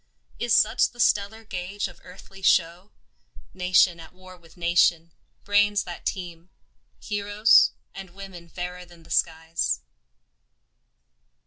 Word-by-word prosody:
Is 240 -2 +2
such 215 - +3
the 240 - -21
stellar 220 0 +1
gauge 195 0 -4
of 180 -2 -16
earthly 195 +1 -14
show, 175 +1 +1 0.6
Nation 180 -1 +3
at 165 - -13
war 185 0 -14
with 170 -1 -21
nation, 170 -1 +2 0.3
brains 205 0 +2
that 175 - -7
teem, 175 -2 -6 0.5
Heroes, 205 +2 +3 0.2
and 195 -1 -9
women 180 -2 -11
fairer 180 +1 -6
than 175 -2 -18
the 160 - -16
skies? 160 - -1
180 Hz, 120 wpm, -25 LUFS, 170-200 Hz, 0.6 s, such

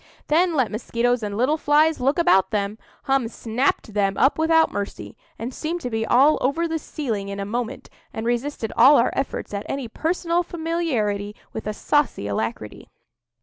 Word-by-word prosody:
Then 335 +2 +3
let 260 -6 +1
mosquitoes 240 +2 0
and 205 -1 -4
little 265 +7 +2
flies 305 +1 +3
look 270 +4 +1
about 330 - +4
them! 210 0 -2 0.2
Hum 270 -3 +1
snapped 230 0 -1
them 195 -2 +1
up 270 +4 +3
without 320 0 +4
mercy, 200 0 -5 0.2
and 235 +4 -5
seemed 330 +6 -3
to 250 - -4
be 225 0 -1
all 280 +5 +5
over 330 +6 +1
the 325 0 -2
ceiling 220 -11 -4
in 200 0 -5
a 200 - -3
moment, 240 +4 -4 0.2
and 220 - -5
resisted 240 0 -2
all 290 +2 +7
our 235 - +3
efforts 270 -5 -3
at 200 0 -3
any 270 -3 -3
personal 335 +6 0
familiarity 295 - -2 0.2
with 220 - -6
a 215 - -1
saucy 290 - 0
alacrity. 105 +1 -4
250 Hz, 175 wpm, -23 LUFS, 215-310 Hz, 0.2 s, all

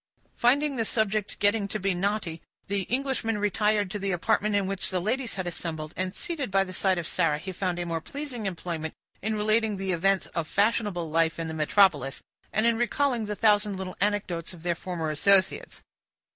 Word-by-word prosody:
Finding 275 +3 +3
the 230 - +1
subject 215 -2 0
getting 205 0 +2
to 215 - -4
be 195 0 +1
knotty, 180 -3 -2 0.2
the 195 -1 -2
Englishman 250 -4 0
retired 210 -1 +1
to 205 - -3
the 195 0 -2
apartment 205 +4 +1
in 200 -1 +2
which 195 0 -3
the 185 - 0
ladies 230 +6 -1
had 185 -1 -3
assembled; 160 -2 -4
and, 185 0 -2
seated 305 -8 -3
by 195 0 +3
the 185 -1 -8
side 190 -1 +2
of 170 - -2
Sarah, 155 -2 +1
he 185 +5 -6
found 185 -1 -2
a 175 - -2
more 165 -1 -2
pleasing 260 - -5
employment 165 -3 -4 0.3
in 220 +2 -1
relating 215 0 +2
the 190 0 -2
events 190 +2 +2
of 165 -2 -2
fashionable 200 -5 +1
life 165 0 +2
in 165 -1 -3
the 160 - -4
metropolis, 155 -3 +3 0.3
and 215 - +1
in 235 -1 +4
recalling 240 -1 +1
the 210 - -2
thousand 210 -2 +3
little 185 -1 -5
anecdotes 195 -5 -1
of 170 -2 -13
their 175 -1 +1
former 170 -2 -3
associates. 190 +5 +3
195 Hz, 195 wpm, -27 LUFS, 175-215 Hz, 0.3 s, in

